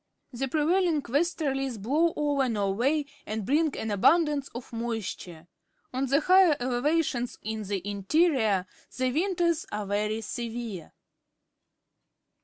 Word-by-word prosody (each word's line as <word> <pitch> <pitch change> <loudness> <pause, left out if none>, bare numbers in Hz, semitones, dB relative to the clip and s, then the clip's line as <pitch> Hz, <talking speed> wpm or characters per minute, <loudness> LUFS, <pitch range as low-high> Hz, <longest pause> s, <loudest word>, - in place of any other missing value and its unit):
The 265 +3 -2
prevailing 320 +2 +2
westerlies 270 -4 -1
blow 300 +11 +1
over 285 -3 +1
Norway 230 +8 +1 0.2
and 215 -1 -3
bring 300 +4 +1
an 220 - -3
abundance 295 - +3
of 240 0 -10
moisture. 220 -8 -5 0.5
On 265 +2 -1
the 280 +4 +3
higher 365 -2 +5
elevations 255 0 0
in 220 0 -3
the 200 -2 -4
interior 210 - +2 0.3
the 255 0 +1
winters 340 +1 0
are 210 0 -3
very 210 +2 -1
severe. 230 -5 -5
255 Hz, 115 wpm, -27 LUFS, 215-305 Hz, 0.5 s, higher